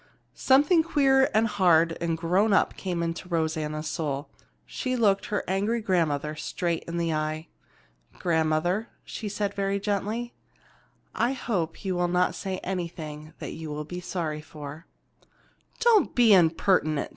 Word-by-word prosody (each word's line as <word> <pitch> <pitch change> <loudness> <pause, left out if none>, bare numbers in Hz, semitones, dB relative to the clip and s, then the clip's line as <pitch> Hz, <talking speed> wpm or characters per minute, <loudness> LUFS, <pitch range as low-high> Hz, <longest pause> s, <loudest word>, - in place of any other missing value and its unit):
Something 290 +6 +4
queer 270 -5 +3
and 220 +1 +3
hard 175 -6 +3
and 165 -1 0
grown 185 +6 +2
up - - +3
came 175 -3 -3
into 170 +2 -4
Rosanna's 155 -2 -1
soul. 145 -3 -3 0.3
She 255 -1 -3
looked 205 -5 +2
her 210 - -1
angry 205 +5 0
grandmother 155 -7 0
straight 170 +2 -2
in 170 0 -4
the 165 -1 0
eye. 155 +1 -3 0.7
"Grandmother," 170 +5 0
she 215 - -6
said 205 0 -2
very 200 0 -1
gently, 210 +4 -2 0.8
"I 245 +3 +1
hope 195 -9 -3
you 190 - 0
will 175 0 +1
not 180 +1 +2
say 190 -2 -4
anything 160 -4 -5
that - - -6
you 160 -1 -7
will 150 0 -4
be 180 +4 -6
sorry 160 -4 -3
for." 150 +1 -10 0.9
"Don't 460 -3 +4
be 235 -4 +6
impertinent!" 165 -3 +3
175 Hz, 145 wpm, -26 LUFS, 160-205 Hz, 0.9 s, be